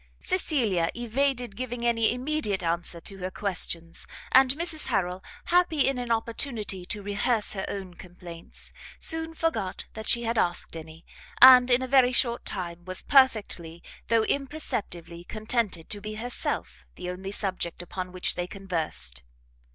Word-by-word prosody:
Cecilia 235 - +1
evaded 245 -1 0
giving 245 0 -4
any 230 -2 +3
immediate 250 -6 -1
answer 170 0 -2
to 195 +3 -5
her 185 0 -3
questions, 175 -4 -2 0.2
and 265 0 +7
Mrs 330 -1 -1
Harrel, 185 -4 -1 0.2
happy 345 -5 +3
in 270 -2 0
an 245 -1 -3
opportunity 225 -5 -2
to 210 -1 -4
rehearse 205 +2 +1
her 190 -2 -3
own 190 -3 -5
complaints, 175 -1 -9 0.3
soon 325 0 0
forgot 220 - -2
that 220 0 -7
she 235 - +5
had 230 -1 0
asked 175 -1 0
any, 160 +1 -10 0.3
and, 255 0 +10
in 250 +1 +4
a - - -3
very 255 -1 +5
short 240 -1 +1
time, 175 -2 -5
was 185 +1 -1
perfectly, 210 - +2 0.2
though 230 -1 +3
imperceptibly, 215 - -3
contented 215 -4 -2
to 205 - -4
be 215 +1 -5
herself 140 - -3
the - - -7
only 190 +2 -6
subject 185 -4 -2
upon 180 +1 -5
which 185 0 0
they 175 0 -3
conversed. 165 - -3
210 Hz, 150 wpm, -27 LUFS, 180-250 Hz, 0.3 s, and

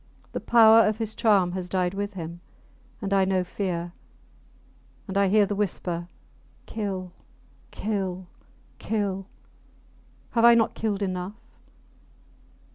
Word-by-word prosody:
The - - -3
power 225 -1 +6
of 215 0 0
his 220 -1 -3
charm 200 -6 +3
has 180 0 -4
died 180 -1 0
with 200 +1 -3
him. 170 -1 -7 0.6
And 200 0 -1
I 195 -1 +4
know 190 -1 +1
fear; 175 -2 -4 1.1
and 195 - -6
I 200 0 +3
hear 205 +2 +4
the 200 - -3
whisper, 175 -4 -2 0.6
Kill! 195 -4 -4 0.6
kill! 190 -3 -3 0.5
kill!... 195 -3 -2 1.0
Have 230 - +1
I 235 0 +8
not 225 -1 +2
killed 210 -2 -2
enough? 185 +1 -3
195 Hz, 120 wpm, -26 LUFS, 185-210 Hz, 1.1 s, I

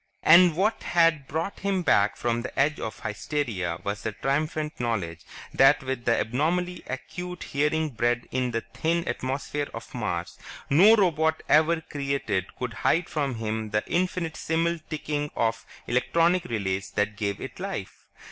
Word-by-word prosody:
And 170 0 +7
what 210 +4 +1
had 165 -5 +2
brought 165 +6 -3
him 195 -2 0
back 105 -9 +3
from 120 0 -1
the 130 - -6
edge 145 +2 +2
of 110 - -6
hysteria 100 - -2
was 100 0 -3
the - - -2
triumphant 150 +5 -2
knowledge 100 -9 -2 0.3
that 135 +1 +5
with 130 -2 -4
the 115 - +3
abnormally 170 +10 0
acute 180 +7 -6
hearing 150 +2 0
bred 120 +1 0
in 130 -1 0
the 115 -1 -1
thin 170 +1 0
atmosphere 140 +2 -2
of 115 - -9
Mars, 90 -8 -3 0.3
no 195 +10 +8
robot 160 -6 +2
ever 160 +2 +4
created 140 - -2
could 125 -2 -4
hide 170 +2 +2
from 145 -5 -1
him 110 -1 -3
the 105 0 0
infinitesimal 170 -1 -1
ticking 150 -1 -2
of 115 -1 -1 0.2
the - - -6
electronic 170 +8 +2
relays 100 -3 -2
that 105 +2 -1
gave 100 -1 -2
it - - -8
life. - - -6
140 Hz, 155 wpm, -26 LUFS, 115-165 Hz, 0.3 s, no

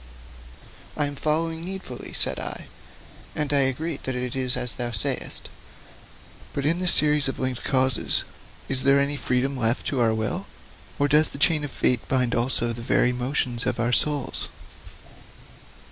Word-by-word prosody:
'I 145 - +1
am 145 0 -4
following 160 +2 -1
needfully,' 185 -7 -7
said - - 0
I, - - -5 0.7
'and 150 -1 -1
I 140 - +5
agree 155 +3 -3
that 130 -2 -4
it 125 0 -4
is 130 -1 0
as 125 -3 +3
thou 120 -1 -3
sayest. 100 -6 +1 1.1
But 140 - -3
in 165 +4 +2
this 180 -1 +6
series 150 -2 +5
of 135 - -3
linked 130 -2 -3
causes 130 -3 +1 0.4
is 130 -1 +4
there 140 +1 +4
any 140 +1 0
freedom 130 +1 -1
left 120 -1 0
to 135 - -2
our 115 -2 +2
will, 145 - -3 0.5
or 145 - +2
does 150 +2 +4
the - - -9
chain 150 +1 +3
of 145 - -4
fate 125 -2 -1
bind 125 -2 0
also 120 -1 0
the 115 - -7
very 125 +1 +2
motions 125 -1 -1
of - - -1
our 120 +1 0
souls?' 145 -1 0
135 Hz, 165 wpm, -24 LUFS, 125-150 Hz, 1.1 s, this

